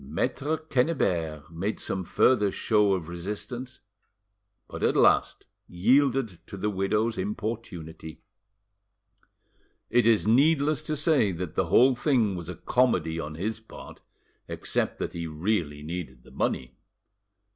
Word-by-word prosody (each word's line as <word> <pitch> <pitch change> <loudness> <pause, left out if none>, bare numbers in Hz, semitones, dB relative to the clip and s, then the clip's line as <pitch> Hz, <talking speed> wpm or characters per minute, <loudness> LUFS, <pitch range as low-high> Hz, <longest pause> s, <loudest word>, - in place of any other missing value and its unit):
Maitre 130 - -2
Quennebert 90 - -1
made 95 +6 -3
some 95 - -3
further 105 +3 +3
show 105 -2 +2
of 90 -4 -3
resistance, 105 +9 -6 0.9
but - - -8
at - - +2
last - - +3 0.2
yielded 120 +1 +2
to 100 - -8
the 105 +2 -1
widow's 105 +3 0
importunity. 95 -6 -5 1.7
It 120 -1 +4
is 115 -3 +4
needless 145 +4 +3
to 155 - -3
say 145 - +3
that 85 -1 -5
the 95 - 0
whole 125 +10 +5
thing 120 -6 +1
was 85 -1 -7
a 90 - -5
comedy 85 -6 +1
on 75 -1 -5
his 105 +7 -3
part, 110 - -12 0.5
except - - -2
that - - -4
he 85 -1 -4
really 80 -2 -2
needed 75 -7 -6
the - - -17
money. 65 -1 -2
100 Hz, 130 wpm, -27 LUFS, 85-125 Hz, 1.7 s, whole